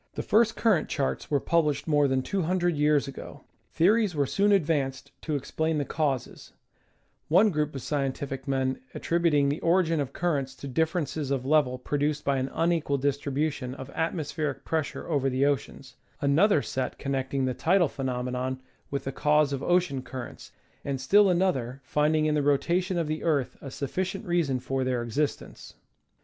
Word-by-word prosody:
The - - -3
first 225 +1 +3
current 205 -9 +2
charts 140 -3 -2
were 145 - +2
published 150 -2 +1
more 145 -2 +3
than 130 -1 0
two 200 +4 -1
hun 180 +3 0
dred 175 -2 +1
years 150 -1 +2
ago. 135 - -9 0.3
Theories 200 +2 +3
were 145 -1 +2
soon 200 +9 +2
advanced 145 -8 0
to 155 - -2
explain 160 +3 -1
the 145 - -1
causes, 140 -6 -3 0.7
one 200 +7 +5
group 150 -2 -1
of 135 - -5
scientific 135 -1 -3
men 130 -1 0 0.2
attributing 165 -4 +2
the 145 - -2
origin 165 -2 +2
of 135 -2 -2
cur 170 0 0
rents 135 -1 -5
to 140 - -8
differences 160 0 -1
of 135 -2 -1
level 140 -3 +3
produced 145 +3 -1
by 140 -1 +2
an 130 +1 -2
unequal 165 -4 +1
distribution 140 -1 -1
of 130 -1 -9
atmospheric 155 -3 -3
pressure 155 -2 -2
over 140 -4 +1
the 130 +2 +1
oceans, 140 -3 -3 0.2
another 150 +4 +3
set 130 -2 -3
connecting 135 -1 -1
the 130 - 0
tidal 170 +7 +3
phenomena 130 -1 -3 0.3
with 140 - -3
the 135 - -3
cause 150 +1 +2
of 135 - -3
ocean 175 -7 +1
currents, 130 -1 -8 0.3
and 140 -2 -3
still 200 +9 +5
another 165 -9 0
finding 150 +3 +1
in 155 - +2
the 150 - +2
rotation 175 +6 +1
of 170 - 0
the 155 +1 -3
earth 145 -6 0
a 140 - -7
sufficient 185 - -3
reason 170 -8 +1
for 135 +1 -2
their 125 -2 -1
existence. 140 +6 -3
145 Hz, 170 wpm, -27 LUFS, 135-165 Hz, 0.7 s, one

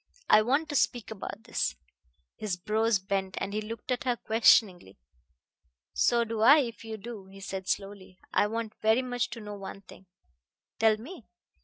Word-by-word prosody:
"I 215 - +7
want 280 +8 +1
to 290 - -3
speak 240 -4 0
about 200 0 -7
this." 225 - -1 0.6
His 205 -5 -3
brows 220 +4 +1
bent, 195 0 -3
and 200 - -4
he 215 - -1
looked 225 +3 -7
at 250 - -1
her 245 -1 +2
questioningly. 210 - +3 1.0
"So 235 -1 +3
do 225 -1 -4
I, 275 +7 +8
if 230 -3 -6
you 220 -1 -6
do," 215 -2 -9
he 195 +1 -13
said 195 -1 -6
slowly. 195 -2 -4 0.2
"I 205 - +3
want 225 0 -4
very 220 +4 +3
much 245 -1 -2
to 235 - -7
know 210 0 -7
one 195 0 -8
thing." 190 0 -15 0.7
"Tell 220 -1 +4
me." 260 - -11
215 Hz, 175 wpm, -29 LUFS, 195-230 Hz, 1.0 s, I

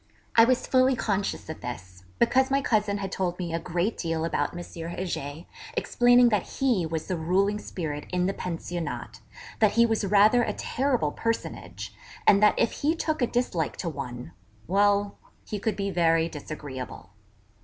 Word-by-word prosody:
I 230 - +8
was 255 +1 +1
fully 260 0 +4
conscious 205 -4 -2
of 160 - -7
this, 95 -7 -7 0.2
because 260 +3 +3
my 275 +1 +3
cousin 210 -6 +1
had 195 -1 -4
told 180 -2 -2
me 175 -3 -4
a 165 - 0
great 175 +6 -1
deal 165 -1 -1
about 145 -3 0
M. 175 - -5
Heger, 170 -2 -5 0.3
explaining 245 0 +5
that 210 -4 +2 0.2
he 235 -11 +2
was 160 -1 -3
the 185 - -2
ruling 190 +5 +1
spirit 150 -8 -5
in 180 0 +1
the 195 - 0
Pensionnat; 175 -1 -5 0.4
that 215 -2 +4
he 235 +1 +5
was 225 -2 0
rather 210 +4 +5
a - - -1
terrible 250 - 0
personage; 105 - -4 0.3
and 200 - +6
that 210 - +5
if 230 - +2
he 310 +3 +2
took 315 -3 -2
a 245 - +3
dislike 225 -11 -1
to 175 - -3
one, 125 - -6 0.3
well, 200 +2 +2 0.3
he 210 - -4
could 220 +2 -1
be 200 -1 -2
very 165 -2 +3
disagreeable. 140 - -7
190 Hz, 170 wpm, -27 LUFS, 165-225 Hz, 0.4 s, I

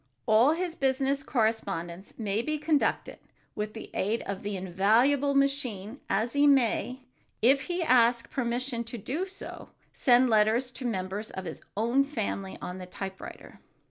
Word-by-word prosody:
All 235 +6 +5
his 345 0 -3
business 270 0 +1
correspondence 200 - -2
may 215 -1 -1
be 305 +5 -2
conducted 300 -1 0 0.3
with 215 +1 -4
the 220 - -8
aid 215 +4 -1
of 200 -1 -5
the 205 -1 -3
invaluable 225 +10 +2
machine, 270 -5 0
and 220 +4 +1
he 290 0 +4
may, 260 -1 +2 0.4
if 270 +3 +4
he 350 0 -1
ask 235 -4 +3
permission 245 -1 -2
to 235 +1 -6
do 295 - -3
so, 390 +1 -9 0.2
send 250 0 +4
letters 225 +3 +3
to 250 0 -5
members 195 0 -3
of 190 - -6
his - - -6 0.2
own 235 +5 +3
family 210 -8 -4
on 180 +1 -5
the 180 - -8
typewriter. 190 +1 -8
235 Hz, 150 wpm, -28 LUFS, 205-275 Hz, 0.4 s, All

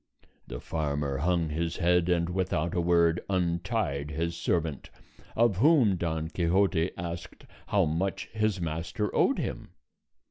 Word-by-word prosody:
The - - -6
farmer 75 -3 -2
hung 85 0 +1
his 80 +2 -2
head, 90 0 +2
and 85 -1 +2
without 90 -2 -1
a 85 - +1
word 85 0 +3
untied 85 -4 -1
his 85 +2 -2
servant, 80 -4 -2 0.5
of 115 -4 +3
whom 130 - +5
Don 80 -2 -2
Quixote 90 +1 +1
asked 85 0 -7 0.2
how 100 -3 +3
much 85 +5 -1
his 110 -3 0
master 85 +5 -3
owed - - +3
him. - - -5
85 Hz, 135 wpm, -28 LUFS, 80-95 Hz, 0.5 s, whom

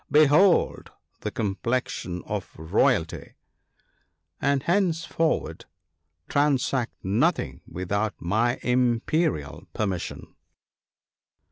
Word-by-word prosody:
Behold 155 +5 +4 0.3
the - - -3
complexion 100 -3 -2
of - - -4
royalty! 80 +1 0 0.5
— 80 +5 -44
and 140 -1 +1
henceforward 165 -3 0 0.6
transact 135 -4 +1
nothing 95 +4 0
without 100 +5 -2
my 115 +7 +1
imperial 125 - 0
permission. 95 -5 -3
120 Hz, 75 wpm, -25 LUFS, 95-150 Hz, 0.6 s, Behold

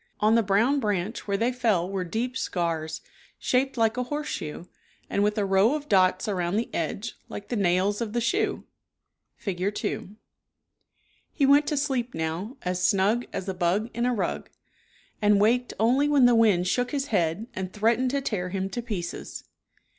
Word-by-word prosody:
On 215 +1 +4
the 230 - +5
brown 225 +8 +2
branch 210 -2 -2
where 200 -1 0
they 235 +4 +1
fell 220 -8 +1
were 190 -1 -2
deep 230 +8 -3
scars, 165 -7 -2 0.4
shaped 265 +1 0
like 225 0 +2
a 250 - 0
horse 295 +3 -3
shoe 155 +3 -5 0.4
and 200 - +1
with 210 +1 +1
a 205 - +1
row 195 +7 +3
of 295 -1 -5
dots 185 -1 +3
around 180 -3 -1
the 230 - -2
edge 195 +8 -3
like 205 - -8
the 245 - -1
nails 195 +2 +1
of 220 -2 -3
the 240 - +1
shoe 300 - 0 0.7
(Fig. 195 +1 -3
2). 200 - -4 1.2
He 285 - +1
went 285 +2 +5
to 295 - 0
sleep 265 -4 -1
now 170 - -3
" - - -40
as 180 0 -2
snug 205 +5 +2
as 190 - -5
a 190 - -1
bug 185 +6 0
in 235 +1 0
a 250 - +1
rug," 205 - -3 0.7
and 205 -1 +4
waked 240 +4 +2
only 260 +6 +3
when 285 -4 +5
the 245 - +6
wind 210 -6 +4
shook 245 +6 +1
his 285 -1 -2
head 175 +2 +1
and 185 -1 -4
threatened 230 +5 +1
to 280 +2 -1
tear 185 -8 -2
him 190 +1 -3
to 240 - -3
pieces. 205 -7 -5
210 Hz, 185 wpm, -26 LUFS, 185-245 Hz, 1.2 s, the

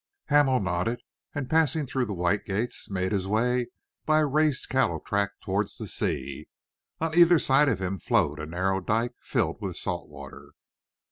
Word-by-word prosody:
Hamel 145 -3 +4
nodded, 95 +5 -1 0.4
and 140 -3 -3
passing 160 0 +2
through 130 -1 -1
the 105 - -4
white 90 +3 0
gates, 105 +5 -2
made 95 -1 -1
his 95 -2 -1
way 120 +4 +1 0.4
by 155 0 +3
a - - +3
raised 150 -1 +1
cattle 130 -12 +1
track 100 +4 -1
towards 100 +1 -1
the - - -6
sea. 65 +1 -3 0.5
On 160 0 -1
either 175 0 +7
side 140 0 +4
of 115 - +1
him 95 0 -3
flowed 75 0 +1
a 80 - -5
narrow 95 +4 0
dike 115 +6 0
filled - - -1
with - - -4
salt - - -3
water. 70 -2 -12
110 Hz, 175 wpm, -27 LUFS, 95-135 Hz, 0.5 s, either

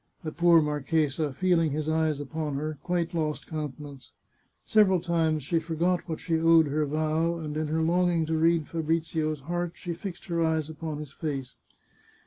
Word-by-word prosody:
The 155 - -3
poor 170 0 +5
marchesa, 150 0 0
feeling 165 +2 +2
his 155 0 -2
eyes 155 -2 +1
upon 150 0 -4
her, 150 +1 -3
quite 175 -2 -1
lost 155 -2 -2
countenance. 145 -3 -7 0.5
Several 200 -4 +4
times 160 -3 0
she 165 +5 +1
forgot 170 +3 -1
what 160 - -3
she 165 -2 0
owed 165 0 +6
her 150 +1 0
vow, 155 +3 0
and 150 -2 -5
in 155 0 -1
her 160 +1 0
longing 170 0 +2
to 160 +1 -1
read 165 -1 +2
Fabrizio's 160 -2 -1
heart, 175 +3 -3
she 175 - -5
fixed 175 +2 -7
her 170 -2 0
eyes 160 -1 0
upon 155 -1 -5
his 150 -2 -7
face. 140 -4 -4
160 Hz, 170 wpm, -27 LUFS, 150-170 Hz, 0.5 s, owed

